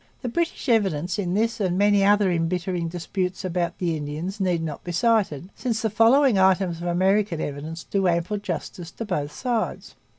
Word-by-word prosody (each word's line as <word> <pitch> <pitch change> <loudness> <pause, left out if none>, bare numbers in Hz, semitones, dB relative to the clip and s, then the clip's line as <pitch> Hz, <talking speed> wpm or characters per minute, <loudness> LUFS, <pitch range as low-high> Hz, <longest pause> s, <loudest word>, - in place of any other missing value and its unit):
The 245 - -2
British 335 +4 -2
evidence 195 - +1
in 180 -2 -1
this 225 +2 0
and 185 -3 0
many 205 0 +4
another 205 -1 +4
embittering 175 +1 -1
dispute 180 +2 -3
about 175 -1 -2
the 170 -3 -1
Indians 155 +7 -5
need 180 -4 0
not 155 -3 -5
be 175 - -5
cited, 190 - +1
since 230 -3 -2
the 220 - 0
following 230 +1 +4
items 190 -2 +3
of 175 - -3
American 190 0 +2
evidence 155 +3 -5
do 195 -2 0
ample 170 +4 0
justice 175 -2 -5
to 230 - -5
both 150 -8 -2
sides. 240 - -3
185 Hz, 175 wpm, -24 LUFS, 170-210 Hz, -, many